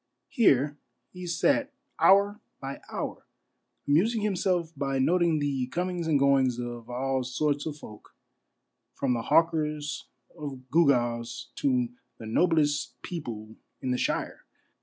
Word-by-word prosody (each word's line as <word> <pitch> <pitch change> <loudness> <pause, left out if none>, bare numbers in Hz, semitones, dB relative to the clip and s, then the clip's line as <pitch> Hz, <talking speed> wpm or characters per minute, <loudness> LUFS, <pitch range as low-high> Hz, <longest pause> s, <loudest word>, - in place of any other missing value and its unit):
Here 145 - +3 0.3
he 180 -1 -8
sat 280 - +2 0.3
hour 200 +2 +5 0.2
by 135 0 -6
hour, - - -5 0.6
amusing 205 +11 +3
himself 180 -4 0
by 135 -1 -1
noting 170 +4 +3
the 140 -3 -1
comings 175 +2 -2
and 155 -3 +4
goings 135 -3 +3
of 120 -1 -6
all 130 +1 -1
sorts 145 +4 -1
of 150 -2 -5
folk, 105 -7 -13 0.8
from 135 -2 0
the 120 - -1
hawkers 150 0 +1 0.3
of 140 -5 -7
gewgaws 120 -6 +2
to 255 -4 +1 0.3
the 110 - -9
noblest 145 -1 +1
people 115 -10 -6 0.2
in 130 -2 -2
the 125 - 0
shire. - - -2
145 Hz, 125 wpm, -28 LUFS, 125-175 Hz, 0.8 s, hour